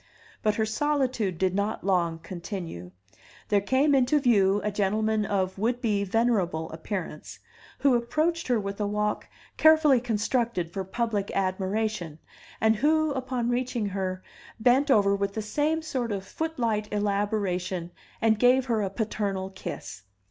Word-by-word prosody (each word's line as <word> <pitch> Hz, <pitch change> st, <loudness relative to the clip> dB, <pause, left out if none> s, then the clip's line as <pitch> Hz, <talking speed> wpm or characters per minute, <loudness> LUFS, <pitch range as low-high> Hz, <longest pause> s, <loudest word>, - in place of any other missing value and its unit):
But 215 Hz, -1 st, +1 dB
her 220 Hz, -, +1 dB
solitude 255 Hz, -, 0 dB
did 185 Hz, 0 st, +1 dB
not 200 Hz, +2 st, -1 dB
long 175 Hz, -4 st, +1 dB
continue; 170 Hz, -, -6 dB, 0.6 s
there 205 Hz, -1 st, +3 dB
came 265 Hz, +8 st, +2 dB
into 270 Hz, +2 st, +3 dB
view 205 Hz, -7 st, +3 dB
a 210 Hz, -, 0 dB
gentleman 215 Hz, +1 st, 0 dB
of 190 Hz, -1 st, -1 dB
would 235 Hz, +3 st, 0 dB
be 210 Hz, -4 st, 0 dB
venerable 195 Hz, -7 st, 0 dB
appearance, 165 Hz, -1 st, -6 dB, 0.4 s
who 275 Hz, -2 st, +4 dB
approached 310 Hz, +8 st, 0 dB
her 245 Hz, -3 st, +2 dB
with 200 Hz, 0 st, -4 dB
a 205 Hz, -, +1 dB
walk 210 Hz, +1 st, -1 dB, 0.3 s
carefully 310 Hz, -5 st, +6 dB
constructed 225 Hz, -5 st, -1 dB
for 195 Hz, -, -2 dB
public 205 Hz, 0 st, -2 dB
admiration, 190 Hz, -2 st, -1 dB, 0.4 s
and 220 Hz, 0 st, +3 dB
who, 310 Hz, +4 st, +2 dB
upon 255 Hz, -3 st, -2 dB
reaching 245 Hz, -3 st, -1 dB
her, 185 Hz, -1 st, -3 dB, 0.4 s
bent 255 Hz, +5 st, +3 dB
over 200 Hz, -6 st, +4 dB
with 200 Hz, 0 st, -2 dB
the 220 Hz, -, -1 dB
same 300 Hz, +8 st, 0 dB
sort 255 Hz, -7 st, -2 dB
of 195 Hz, -1 st, -3 dB
footlight 230 Hz, -10 st, -2 dB
elaboration 200 Hz, -4 st, -1 dB, 0.3 s
and 220 Hz, -1 st, +3 dB
gave 250 Hz, +2 st, +4 dB
her 230 Hz, -4 st, 0 dB
a 195 Hz, -, -1 dB
paternal 195 Hz, -2 st, -2 dB
kiss. 185 Hz, -, -7 dB
210 Hz, 145 wpm, -27 LUFS, 195-245 Hz, 0.6 s, carefully